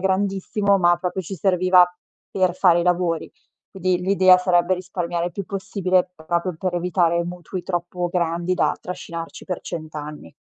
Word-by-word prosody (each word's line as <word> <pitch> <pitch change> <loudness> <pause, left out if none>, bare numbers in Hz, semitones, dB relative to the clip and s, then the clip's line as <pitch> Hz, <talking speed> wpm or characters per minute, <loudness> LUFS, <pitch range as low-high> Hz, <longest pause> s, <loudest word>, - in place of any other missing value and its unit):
grandissimo, 195 +1 +1
ma 175 -1 +4
proprio 180 +1 -3
ci 190 +3 -6
serviva 185 0 +4 0.5
per 185 -2 +1
fare 175 -2 +4
i - - 0
lavori. 175 -2 0 0.4
Quindi 185 -1 0
l'idea 185 -1 +6
sarebbe 180 0 +2
risparmiare 175 -2 -3
il 175 - -5
più 200 +3 -5
possibile 185 -2 0
proprio 170 +2 -2
per 185 0 -2
evitare 175 -1 +1
mutui 175 +1 -6
troppo 175 0 -3
grandi 170 0 -1
da - - +1
trascinarci 170 -2 -7
per 180 -3 -4
100 155 -3 -7
anni. 150 - -8
180 Hz, 155 wpm, -22 LUFS, 170-185 Hz, 0.5 s, l'idea